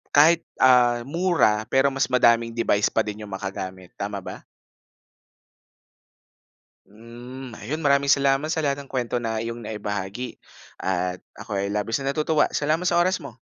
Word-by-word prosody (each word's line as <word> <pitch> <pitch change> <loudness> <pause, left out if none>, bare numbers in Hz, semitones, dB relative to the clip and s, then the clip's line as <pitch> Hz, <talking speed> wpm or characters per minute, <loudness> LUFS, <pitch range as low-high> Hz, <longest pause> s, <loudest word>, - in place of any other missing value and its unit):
kahit, 160 +3 +5
ah, 120 -2 +5
mura 155 -8 +2
pero 135 +2 +3
mas 135 0 0
madaming 115 -2 +3
device 105 -3 +2
pa 110 - +2
din 105 0 -6
yung 100 - -12
magagamit, 95 -1 -6
tama 100 -1 -4
ba? - - -9 2.4
Hmm, 120 +4 -10
ayun, 150 +8 -4
maraming 140 0 +3
salamat 140 +2 +3
sa 160 -1 -1
lahat 140 0 0
ng 140 - -12
kuwento 125 -2 -2
na 115 -1 -2
iyong 115 +1 -5
naibahagi, 105 +2 -5 0.4
at 90 -1 -1 0.2
ako 100 -2 -4
ay 100 - -1
labis 105 +5 -1
na 135 0 -1
natutuwa. 155 0 +2
Salamat 155 +5 +1
sa 170 - +1
oras 185 +1 +1
mo. 130 -4 -11
120 Hz, 150 wpm, -24 LUFS, 105-140 Hz, 2.4 s, kahit